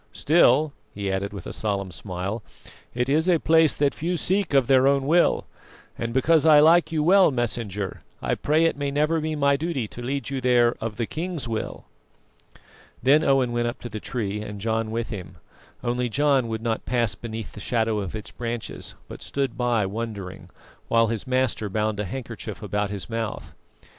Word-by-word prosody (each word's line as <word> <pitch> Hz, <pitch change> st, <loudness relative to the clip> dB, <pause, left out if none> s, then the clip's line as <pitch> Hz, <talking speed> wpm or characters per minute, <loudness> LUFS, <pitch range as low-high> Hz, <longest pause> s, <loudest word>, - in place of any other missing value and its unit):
Still," 150 Hz, -1 st, +4 dB, 0.2 s
he 100 Hz, -1 st, -2 dB
added 95 Hz, +1 st, -2 dB
with 100 Hz, -, -8 dB
a -, -, -6 dB
solemn 100 Hz, -3 st, -2 dB
smile, 90 Hz, +6 st, -4 dB, 0.5 s
"it 125 Hz, 0 st, 0 dB
is 155 Hz, +6 st, +2 dB
a 175 Hz, -, +5 dB
place 160 Hz, -1 st, +4 dB
that 145 Hz, -1 st, +1 dB
few 175 Hz, +3 st, -2 dB
seek 190 Hz, -3 st, +1 dB
of 135 Hz, -2 st, +5 dB
their 130 Hz, +1 st, +5 dB
own 140 Hz, -1 st, +2 dB
will, 170 Hz, +4 st, +3 dB, 0.5 s
and, 115 Hz, 0 st, -3 dB
because 150 Hz, +5 st, +3 dB
I 155 Hz, -2 st, +7 dB
like 165 Hz, +2 st, +5 dB
you 155 Hz, -2 st, +1 dB
well, 190 Hz, +3 st, +6 dB
Messenger, 110 Hz, -6 st, -2 dB, 0.2 s
I -, -, -1 dB
pray 155 Hz, +3 st, +2 dB
it 165 Hz, -, +2 dB
may 140 Hz, 0 st, -2 dB
never 150 Hz, +3 st, +1 dB
be 155 Hz, 0 st, -2 dB
my 140 Hz, -1 st, +3 dB
duty 150 Hz, -7 st, -2 dB
to 120 Hz, -, -8 dB
lead 135 Hz, +2 st, -3 dB
you 135 Hz, -1 st, -2 dB
there 120 Hz, -1 st, +4 dB
of 110 Hz, -2 st, -4 dB
the 115 Hz, -, 0 dB
king's 165 Hz, 0 st, -4 dB
will." 110 Hz, -1 st, -4 dB, 1.2 s
Then 145 Hz, +5 st, +5 dB
Owen 135 Hz, -4 st, +3 dB
went 120 Hz, 0 st, 0 dB
up 120 Hz, -, -4 dB
to 120 Hz, -, -6 dB
the 110 Hz, -1 st, -5 dB
tree 105 Hz, -3 st, -3 dB
and 105 Hz, -1 st, -7 dB
John 110 Hz, +1 st, -1 dB
with 115 Hz, +1 st, -3 dB
him, 95 Hz, -5 st, -7 dB, 0.5 s
only 125 Hz, 0 st, -1 dB
John 140 Hz, -1 st, +2 dB
would 110 Hz, 0 st, -4 dB
not 115 Hz, -1 st, -2 dB
pass 120 Hz, -3 st, +1 dB
beneath 115 Hz, -2 st, -7 dB
the -, -, -10 dB
shadow 110 Hz, 0 st, 0 dB
of 100 Hz, 0 st, -5 dB
its 105 Hz, -, -7 dB
branches; 120 Hz, -1 st, -5 dB
but -, -, -10 dB
stood 140 Hz, -1 st, -2 dB
by 120 Hz, -4 st, +1 dB
wondering, 100 Hz, -2 st, -6 dB, 0.4 s
while 115 Hz, -1 st, +3 dB
his 115 Hz, +3 st, -3 dB
master 130 Hz, -5 st, 0 dB
bound 105 Hz, +1 st, -1 dB
a 105 Hz, -, -1 dB
handkerchief 115 Hz, +1 st, -7 dB
about 105 Hz, 0 st, -1 dB
his 100 Hz, -2 st, -5 dB
mouth. 115 Hz, -1 st, -4 dB
120 Hz, 190 wpm, -24 LUFS, 110-140 Hz, 1.2 s, I